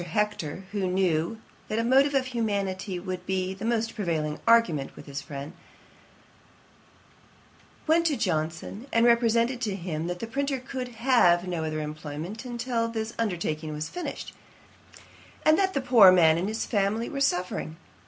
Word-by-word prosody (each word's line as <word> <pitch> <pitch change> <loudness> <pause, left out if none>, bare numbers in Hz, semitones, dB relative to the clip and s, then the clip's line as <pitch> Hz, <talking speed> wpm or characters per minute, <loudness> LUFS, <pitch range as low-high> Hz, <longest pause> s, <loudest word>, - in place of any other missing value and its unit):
Hector, 180 -2 -2
who 200 -3 -1
knew 180 +2 0 0.3
that 215 - -2
a 230 - +1
motive 270 +4 +4
of 265 -1 +2
humanity 200 -6 -2
would 185 0 -5
be 190 0 -1
the 195 +3 -7
most 230 -1 0
prevailing 155 -7 -2
argument 175 -13 +3
with - - -11
his 140 -1 -5
friend, 140 +3 -7 2.3
went 335 +2 +3
to 295 -4 0
Johnson, 170 - -2
and 230 +1 +4
represented 235 +1 +3
to 210 -5 -1
him, 170 -3 -4
that 175 0 -3
the 230 - -5
printer 275 +4 -1
could 255 0 -5
have 230 -8 +3
no 170 -3 -2
other 155 0 -2
employment 155 - -6
till 235 -1 -1
this 225 0 -4
undertaking 165 -7 -2
was 150 +1 -4
finished, 355 - -6 1.1
and 310 - +6
that 380 -1 +1
the 275 - +1
poor 235 -7 +8
man 165 -3 +5
and 185 - -1
his 220 +2 -2
family 210 +2 0
were 280 -3 -4
suffering. 180 - -1
200 Hz, 155 wpm, -27 LUFS, 170-235 Hz, 2.3 s, poor